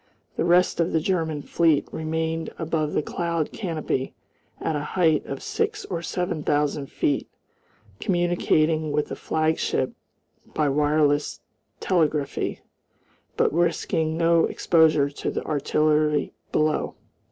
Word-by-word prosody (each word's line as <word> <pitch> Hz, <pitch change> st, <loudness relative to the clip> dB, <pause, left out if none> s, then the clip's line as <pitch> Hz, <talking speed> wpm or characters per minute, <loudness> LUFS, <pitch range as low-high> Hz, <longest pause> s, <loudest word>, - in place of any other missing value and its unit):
The -, -, 0 dB
rest 175 Hz, +1 st, +3 dB
of 170 Hz, -, +1 dB
the 160 Hz, -, +3 dB
German 160 Hz, -4 st, -1 dB
fleet 160 Hz, -4 st, +2 dB
remained 160 Hz, +1 st, -2 dB
above 160 Hz, -2 st, -1 dB
the -, -, +1 dB
cloud 170 Hz, -2 st, -2 dB
canopy 160 Hz, -8 st, -3 dB, 0.4 s
at 160 Hz, -, -1 dB
a -, -, 0 dB, 0.2 s
height 160 Hz, -4 st, +3 dB
of -, -, -5 dB
six 435 Hz, -1 st, -2 dB
or 170 Hz, -3 st, -4 dB
seven 175 Hz, -1 st, -2 dB
thousand 145 Hz, -1 st, 0 dB
feet, 140 Hz, 0 st, -1 dB, 0.7 s
communicating 165 Hz, -3 st, +1 dB
with 150 Hz, 0 st, 0 dB
the -, -, -4 dB
flagship 160 Hz, 0 st, 0 dB, 0.6 s
by 150 Hz, -2 st, +2 dB
wireless 145 Hz, 0 st, +1 dB, 0.4 s
telegraphy, 155 Hz, -5 st, 0 dB, 0.8 s
but -, -, +2 dB
risking 165 Hz, -1 st, 0 dB
no 170 Hz, 0 st, +4 dB
exposure 155 Hz, -4 st, +3 dB
to -, -, -4 dB
the -, -, -3 dB
artillery 150 Hz, 0 st, +1 dB, 0.2 s
below. 155 Hz, 0 st, 0 dB
160 Hz, 120 wpm, -24 LUFS, 150-170 Hz, 0.8 s, no